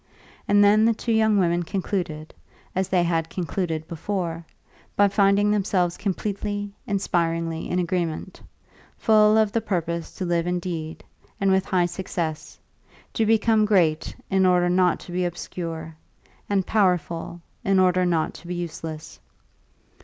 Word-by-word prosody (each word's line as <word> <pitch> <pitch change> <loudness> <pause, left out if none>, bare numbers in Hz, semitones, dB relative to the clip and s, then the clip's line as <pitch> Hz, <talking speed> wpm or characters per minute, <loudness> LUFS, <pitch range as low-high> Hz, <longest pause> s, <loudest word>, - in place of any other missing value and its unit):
And 205 0 +5
then 210 +2 +5
the 230 0 +3
two 230 - -3
young 220 -1 +3
women 175 -2 +2
concluded, 175 -4 -3 0.4
as 190 0 0
they 180 -2 +3
had 165 -1 0
concluded 165 -3 -3
before, 170 0 -3 0.5
by 205 - +5
finding 200 +1 +3
themselves 185 -4 +1
completely, 205 +1 -3
inspiringly 165 -4 -1
in 180 - 0
agreement, 175 0 -2 0.6
full 215 -1 +5
of 215 -2 +3
the 230 - 0
purpose 170 -4 -2
to 185 - -3
live 170 -1 0
indeed, 170 -3 -4 0.4
and 195 -1 +2
with 190 0 +2
high 180 -2 +2
success; 175 -3 -4 0.6
to 225 - +1
become 220 0 +3
great, 175 -7 +2
in 190 0 +2
order 180 -1 +3
not 180 -1 +3
to - - -10
be 180 +1 -1
obscure, 165 -2 -5 0.5
and 195 -2 +1
powerful, 175 -5 0 0.2
in 195 0 +2
order 185 -1 +3
not 170 -3 0
to 175 - -13
be 180 - -3
useless. 160 -2 -6
180 Hz, 140 wpm, -24 LUFS, 170-200 Hz, 0.6 s, And